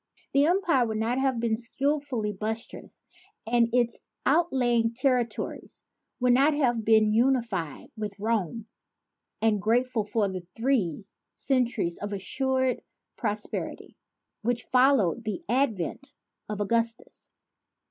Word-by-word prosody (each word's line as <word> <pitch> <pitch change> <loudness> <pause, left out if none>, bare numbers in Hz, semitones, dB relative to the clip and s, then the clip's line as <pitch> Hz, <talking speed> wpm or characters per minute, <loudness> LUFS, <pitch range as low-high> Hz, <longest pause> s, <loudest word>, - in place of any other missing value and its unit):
The 280 +2 +5
empire 340 -9 +2
would 220 -1 -2
not 230 +4 0
have 265 -3 +1
been 230 -1 +1
skilfully 260 -2 -2
buttressed 220 +3 -5 0.4
and 235 0 +3
its 240 -1 +1 0.3
outlying 245 -7 +2
territories 250 -4 -1 0.4
would 250 -1 +4
not 280 +4 +4
have 240 -6 +1
been 220 -1 +4
unified 230 - 0
with 210 -3 -5
Rome 220 -1 -1 0.8
and 215 -3 +3
grateful 235 +2 +1
for 210 0 0
the 190 -1 -4 0.2
three 225 - 0 0.3
centuries 240 -10 0
of 205 0 -4
assured 260 +6 0 0.3
pros 210 -3 -2
perity - - -6 0.5
which 235 +1 -1
followed 250 -5 +4
the 220 +10 -4
advent 260 - -1 0.4
of 210 -1 -3
Augustus. 230 +2 -1
235 Hz, 115 wpm, -27 LUFS, 215-260 Hz, 0.8 s, The